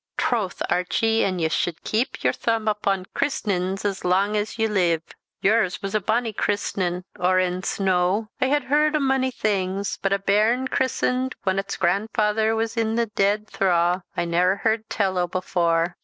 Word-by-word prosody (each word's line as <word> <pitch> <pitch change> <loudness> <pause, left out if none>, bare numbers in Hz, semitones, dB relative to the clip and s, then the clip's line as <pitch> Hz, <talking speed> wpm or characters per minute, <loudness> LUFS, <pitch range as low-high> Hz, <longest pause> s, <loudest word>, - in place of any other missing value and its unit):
"Troth, 215 -7 -1
Archie 225 +5 +1
an' 185 -2 0
ye 165 -2 +1
sude 165 0 -2
keep 235 +5 -1
your - - +3
thoomb 225 -2 -1
upon 200 -3 0
kirsnins 195 -7 -1
as 195 -1 -2
lang's 205 +4 +1
ye 225 - +2
leeve; 175 -6 +1 0.4
yours 205 -2 +2
was 195 0 -3
a 215 - +2
bonnie 225 +3 0
kirsnin 185 -3 -1 0.2
or 185 +1 +3
ens 185 +1 -1
no! 190 +2 +1
I 260 - +3
hae 290 +1 +2
heard 300 +3 +2
o' - - +2
mony 265 -1 +1
things, 200 -4 -2
but 195 - 0
a 200 - +3
bairn 215 +6 +2
kirsened 260 0 0
whan 190 -1 +1
its 195 0 -4
grandfaither 215 +4 +1
was 225 +1 -2
i' 225 0 0
the 230 -2 0
deed 205 +2 +1
thraw, 180 -2 +1 0.2
I - - 0
ne'er 180 +3 +2
heard 220 0 0
tell 190 -3 0
o' 175 - +1
before." 170 -1 0
200 Hz, 170 wpm, -23 LUFS, 185-225 Hz, 0.4 s, your